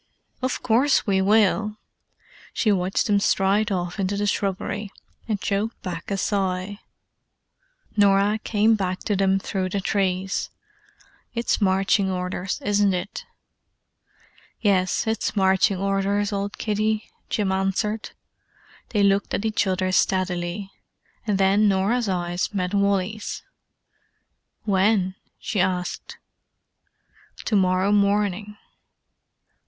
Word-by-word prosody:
"Of 255 0 -2
course 250 +4 +3
we 195 -2 +2
will." 210 +1 +2 0.8
She 215 - +2
watched 190 0 +1
them 205 -2 +3
stride 200 +2 +2
off 180 0 -2
into 195 +1 -1
the 205 - 0
shrubbery, 200 0 -2 0.4
and 215 -3 -1
choked 205 +4 -2
back 170 -3 -5
a 200 - -1
sigh. 195 0 -1 1.2
Norah 200 +1 +3
came 220 +1 +3
back 185 -3 -1
to 210 - -1
them 195 0 +2
through 190 -1 -2
the 200 - -1
trees. 190 -1 -1 0.9
"It's 235 -1 0
marching 195 0 +2
orders, 180 0 -3
isn't 205 -1 +3
it?" 180 +3 -5 1.3
"Yes, 190 -3 +1
it's 220 0 -1
marching 190 0 +3
orders, 195 +1 0
old 200 0 -3
kiddie," 215 0 -1 0.2
Jim 200 -3 0
answered. 195 +3 -1 0.8
They 210 -3 +1
looked 200 0 +2
at 210 - -3
each 215 -2 +1
other 185 0 0
steadily: 185 +1 0 0.6
and 205 -2 +1
then 195 +2 +4
Norah's 205 +4 +1
eyes 175 -1 -1
met 180 0 -1
Wally's. 200 +1 0 1.2
"When?" 195 -1 +2 0.2
she 210 - -3
asked. 180 -1 -2 1.3
"To 215 - 0
morrow 185 0 +2
morning." 205 0 +1
200 Hz, 115 wpm, -24 LUFS, 190-210 Hz, 1.3 s, then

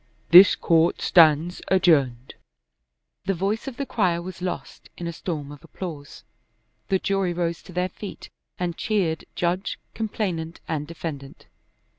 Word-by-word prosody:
This 180 +3 +10
court 165 0 +2
stands 165 +1 +4
adjourned." 140 -10 +2 0.9
The 195 0 0
voice 200 +8 -2
of 255 -3 -6
the 280 - -2
crier 185 -9 +1
was 180 0 -8
lost 175 -8 -5
in 175 - -6
a 170 - -3
storm 150 -4 -5
of 145 - -12
applause. 155 -6 -8 0.6
The 190 - +2
jury 195 -2 0
rose 170 -1 -2
to - - -13
their 180 +1 -1
feet 200 +2 -9 0.3
and 175 -2 -2
cheered 185 -7 -1
judge, 180 +2 -1 0.2
complainant, 180 -7 -3
and 150 -2 -3
defendant. 150 -4 -7
175 Hz, 140 wpm, -24 LUFS, 160-190 Hz, 0.9 s, This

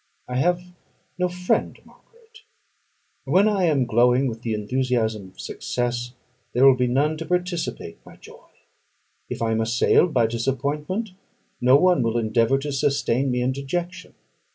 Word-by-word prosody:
I 125 - -3
have 175 +5 +1 0.6
no 180 0 +1
friend, 180 0 -1
Margaret: 455 -1 -22 0.8
when 185 +10 +3
I 200 -4 +1
am 145 -6 +2
glowing 125 +3 +3
with 115 -3 -4
the 115 -2 -2
enthusiasm 110 -2 -1
of - - -23
success, 120 0 -3 0.4
there 130 +2 +4
will 135 -1 +7
be 125 -1 0
none 145 +5 +1
to 165 - -6
participate 180 -1 -3
my - - -15
joy; - - -16 0.8
if - - -4
I 115 - 0
am 110 0 +1
assailed 120 +9 +3
by 120 -5 +3
disappointment, 140 - -2 0.5
no 125 +2 +5
one 180 0 +4
will 115 0 0
endeavour 115 +3 +2
to 145 +2 -4
sustain 135 -1 0
me 125 -1 0
in 130 - +1
dejection. 175 +7 -5
135 Hz, 155 wpm, -23 LUFS, 120-175 Hz, 0.8 s, will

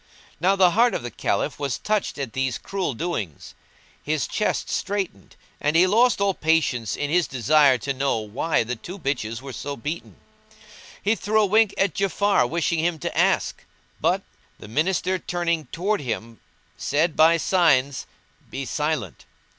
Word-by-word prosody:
Now 185 +4 +3
the 185 -2 +5
heart 235 +5 +3
of - - -3
the 120 - -5
Caliph, 100 - -1
was 140 -4 -2
touched 210 -6 -1
at 135 -6 -4
these 130 -2 -1
cruel 190 -9 -3
doings; 115 - -4 0.5
his 155 0 -1
chest 215 - -1
straitened 195 - -3 0.2
and 150 +2 0
he 175 +3 +6
lost 230 +6 +3
all 200 -1 +2
patience 155 - +1
in 145 0 -3
his 175 0 +3
desire 135 +1 +4
to 140 +4 -3
know 135 -2 0
why 110 +8 -1
the 120 +2 -4
two 180 - -9
bitches 130 - -3
were 135 -1 -7
so 140 +2 -5
beaten. 150 +8 -5 0.9
He 205 - +3
threw 215 0 +1
a - - +4
wink 215 +1 +3
at 195 -4 +2
Ja'afar 195 -6 +2
wishing 170 0 0
him 165 0 0
to - - -5
ask, - - +1 0.4
but; - - +1 0.3
the - - -11
Minister 180 - 0
turning 170 -3 -2
towards 195 +1 -1
him 115 -2 -5 0.4
said 155 +3 0
by 165 +1 +6
signs, 140 -7 +2 0.4
"Be 135 - -5
silent!" 150 - -3
155 Hz, 160 wpm, -24 LUFS, 130-185 Hz, 0.9 s, he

